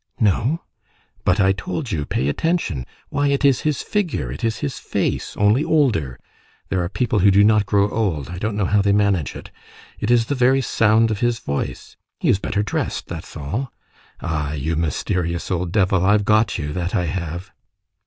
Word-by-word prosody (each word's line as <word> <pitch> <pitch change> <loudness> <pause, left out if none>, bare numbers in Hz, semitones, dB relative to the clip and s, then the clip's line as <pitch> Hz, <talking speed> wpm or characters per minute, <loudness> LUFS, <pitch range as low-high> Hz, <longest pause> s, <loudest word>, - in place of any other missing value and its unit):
"No." 115 - +2 0.6
"But 90 +3 +3
I 95 -1 +5
told 95 - -4
you: 75 -3 -1
'Pay 65 - -1
attention!' 95 - -1 0.2
Why, 145 0 0
it 140 +1 +1
is 135 -3 +4
his 150 -4 -1
figure, 205 -7 -1
it - - -7
is 115 -3 0
his 70 - -4
face, - - -2
only 105 +7 +3
older,—there 95 - -1
are 85 - -3
people 115 0 0
who 100 +2 +5
do 100 +1 +5
not 105 -1 +4
grow 100 -1 +3
old, 95 - -1
I 90 +1 -6
don't 110 +1 -2
know 105 -2 0
how 105 +2 +3
they 100 0 +2
manage 100 -7 +1
it,—it 105 - -10
is 120 -1 +4
the 145 - -1
very 130 0 +3
sound 115 -2 +3
of 105 - -2
his 120 -1 +1
voice. 70 -11 -5 0.2
He - - +1
is 95 - +3
better 105 0 -1
dressed, 105 - -3
that - - -6
is - - -14
all! 105 - -3 0.5
Ah! 75 -3 -2
you 75 +3 -2
mysterious 85 +2 -2
old 90 -1 -1
devil, 95 -2 +2
I've 105 +1 +3
got 110 0 +3
you, 75 0 -4
that 90 0 -2
I 90 - +1
have!" 85 +1 -4
100 Hz, 190 wpm, -21 LUFS, 85-115 Hz, 0.6 s, I